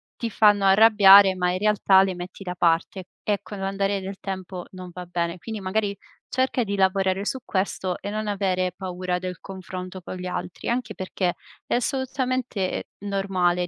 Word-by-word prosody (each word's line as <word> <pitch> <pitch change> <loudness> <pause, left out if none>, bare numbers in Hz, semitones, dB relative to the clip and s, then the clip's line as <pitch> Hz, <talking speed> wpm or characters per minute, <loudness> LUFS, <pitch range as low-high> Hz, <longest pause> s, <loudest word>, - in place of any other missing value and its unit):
ti 235 - -3
fanno 205 -1 +4
arrabbiare, 200 -1 +8
ma 180 -1 +1
in 185 - -2
realtà 210 -2 +4
le 190 -1 -2
metti 180 +2 -8
da 180 -1 -5
parte, 175 +2 +1 0.2
e 205 -1 0
con 205 -2 -8
l'andare 195 +1 -1
del 190 +1 -6
tempo 185 -2 -5
non 185 -1 -9
va 180 0 -7
bene. 170 0 -2
Quindi, 220 +3 -6
magari 200 +1 -1 0.3
cerca 260 -1 +1
di 200 -2 -3
lavorare 190 0 +2
su 260 - -1
questo 190 -1 -2
e 200 - -5
non 215 +1 -3
avere 185 -3 0
paura 180 -1 -3
del 180 -1 -5
confronto 185 -1 -7
con 180 - -7
gli 180 0 -6
altri, 180 -1 -5
anche 245 +1 -2
perché 185 -1 -2 0.3
è - - +1
assolutamente 255 -5 -1
normale 185 -3 0
190 Hz, 170 wpm, -24 LUFS, 185-205 Hz, 0.3 s, arrabbiare